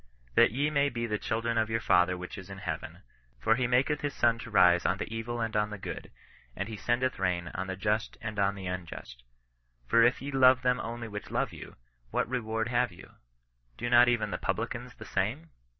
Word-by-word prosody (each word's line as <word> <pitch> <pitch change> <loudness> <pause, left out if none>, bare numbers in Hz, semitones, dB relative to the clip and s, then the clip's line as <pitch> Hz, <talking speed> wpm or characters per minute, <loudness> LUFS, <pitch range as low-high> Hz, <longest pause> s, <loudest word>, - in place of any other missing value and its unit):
" - - -32
That - - +7
ye 145 +6 0
may 140 -1 +3
be 115 -2 -3
the 105 -2 -2
children 115 +1 -1
of 110 0 0
your 115 0 0
Father 90 -3 +3
which 90 0 -7
is 95 -1 -10
in 100 - -8
heaven; 90 -5 -6 0.4
for 110 - +3
he 125 +1 +1
maketh 130 +4 +2
his 145 -1 -3
sun 115 -1 +3
to 115 - -8
rise 90 -4 +5
on 90 - +1
the 110 - -5
evil 120 +1 -3
and 115 -1 -2
on 105 0 +2
the 105 - -6
good, - - -7 0.5
and 95 - -3
fiondeth 120 +4 -1
rain 85 -1 0
on 95 +1 -3
the 95 - -3
just 105 +3 -1
and 110 -4 -5
on 100 0 +2
the 95 -1 -7
unjust. 90 -9 -6 0.6
For 115 - +4
if 120 +2 +4
ye 140 +2 -5
love 130 -1 +5
them 125 0 +2
(only) 115 0 -5
which 105 -1 -7
love - - -1
you, - - -10 0.3
what - - 0
reward 115 -2 -2
have 125 -2 +1
you? 85 - -14 0.7
Do 120 +1 -3
not 120 0 +7
even 110 -4 +1
the - - -3
publicans - - -3
the - - -10
same 80 -1 -2
110 Hz, 220 wpm, -29 LUFS, 95-120 Hz, 0.7 s, That